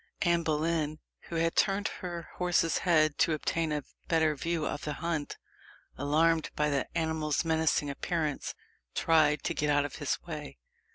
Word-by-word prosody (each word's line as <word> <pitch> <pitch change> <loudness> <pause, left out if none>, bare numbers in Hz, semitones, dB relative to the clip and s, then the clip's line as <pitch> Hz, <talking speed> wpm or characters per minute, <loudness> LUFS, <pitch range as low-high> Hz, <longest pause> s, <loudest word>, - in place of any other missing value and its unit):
Anne 170 -2 +3
Boleyn, 155 -1 0 0.3
who 170 - -4
had 165 0 +1
turned 200 0 +2
her 175 -3 -6
horse's 175 -2 +2
head 155 -4 +3
to 165 - +4
obtain 160 +1 -1
a 150 -1 -1 0.2
better 160 -2 +3
view 165 +1 -1
of 145 - -3
the 150 - -2
hunt, 160 -2 -3 0.6
alarmed 160 +3 +2
by 150 0 +1
the 140 -2 0
animal's 160 -1 0
menacing 160 -2 +2
appearance, 150 +1 -2 0.4
tried 155 -2 +3
to - - -1
get 150 0 0
out 145 0 +3
of 145 - -6
his 145 -3 -1
way. 150 -4 -7
160 Hz, 160 wpm, -30 LUFS, 150-165 Hz, 0.6 s, to